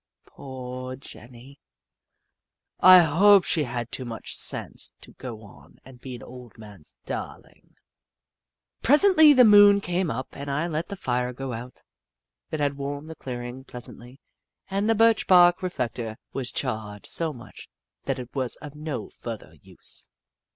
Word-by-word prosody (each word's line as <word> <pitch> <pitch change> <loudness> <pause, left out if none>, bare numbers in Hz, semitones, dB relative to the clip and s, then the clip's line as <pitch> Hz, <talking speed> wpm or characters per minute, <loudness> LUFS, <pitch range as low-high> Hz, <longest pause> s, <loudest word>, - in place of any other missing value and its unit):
Poor 130 -1 -8
Jenny! 130 +1 -13 1.2
I 185 0 +9
hope 190 +5 +5
she 155 -5 +1
had 120 -1 -5
too 130 - -4
much 115 -2 -4
sense - - 0
to - - -13
go 105 - -11 0.2
and 130 -2 -15
be 130 -2 -7
an 120 - -11
old 125 -2 -13
man's 105 -7 -12
darling. - - -8 1.1
Presently 315 - +6
the 255 -3 +7
moon 205 -1 +7
came 180 -2 -2
up 130 -2 -4
and 140 0 -8
I 145 +4 -1
let 165 -1 -3
the 200 - -6
fire 125 -7 -2
go 130 0 -6
out. 120 +3 -9 0.7
It 155 - -4
had 145 -1 -1
warmed 145 +3 -5
the - - -9
clearing 125 -1 -7
pleas 125 -2 -9
antly, 125 +2 -14 0.5
and 200 +3 0
the 225 - +3
birch 225 +1 +3
bark 175 -1 +6
reflector 120 -10 -4 0.2
was 130 -2 -3
charred 110 -5 -4
so 165 -2 -1
much 125 -3 -13 0.4
that 135 -1 -1
it 125 -1 -9
was 130 -3 -2
of 150 -2 -11
no 150 -2 -6
further 115 -3 -8
use. - - -7
135 Hz, 150 wpm, -25 LUFS, 125-175 Hz, 1.2 s, I